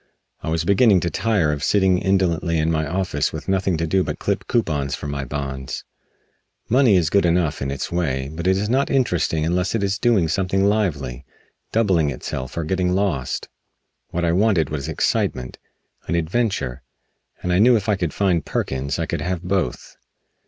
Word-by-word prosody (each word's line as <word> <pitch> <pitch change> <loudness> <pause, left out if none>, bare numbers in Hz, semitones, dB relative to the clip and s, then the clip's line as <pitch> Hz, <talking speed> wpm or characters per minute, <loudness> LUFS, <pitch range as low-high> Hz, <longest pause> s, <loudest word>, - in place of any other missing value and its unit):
I - - -4
was 80 +1 0
beginning 100 +1 +5
to 85 - -1
tire 100 -4 +1
of 75 0 -3
sitting 95 -3 +3
indolently 90 -3 +1
in 80 +1 +1
my 80 -1 0
office 85 -4 -1
with 80 - -7
nothing 95 -2 +1
to 80 - -1
do 95 +3 +2
but - - -4
clip - - -2
coupons 75 -11 0
from 70 0 -6
my 70 -1 -3
bonds. 65 -1 -5 0.8
Money 125 -3 +4
is 85 -4 +2
good 100 - +4
enough, 85 -3 +1
in 70 - -2
its 70 0 -4
way, 70 -6 -1
but 85 +3 -3
it 95 0 +3
is 105 +2 -1
not 130 +5 +1
interesting 90 - +1
unless 90 +4 0
it 110 - 0
is 100 +1 0
doing 110 -9 +3
something 95 +3 +1
lively 75 - 0 0.5
doubling 95 -9 +2
itself 65 0 -5
or 85 - 0
getting 90 +2 0
lost. 90 -10 -1 0.6
What 85 0 -1
I 85 - +2
wanted 90 -5 +2
was 75 0 -3
excitement 65 -4 -1 0.5
an - - 0
adventure 85 - -1 0.6
and 90 - 0
I 90 - +3
knew 120 +4 +6
that - - +5
if - - -10
I 105 - +3
could 85 -5 -2
find 90 -4 +1
Perkins 65 +1 -2
I - - -1
could - - -3
have 90 -1 -2
both. 90 -9 -2
85 Hz, 190 wpm, -22 LUFS, 75-95 Hz, 0.8 s, knew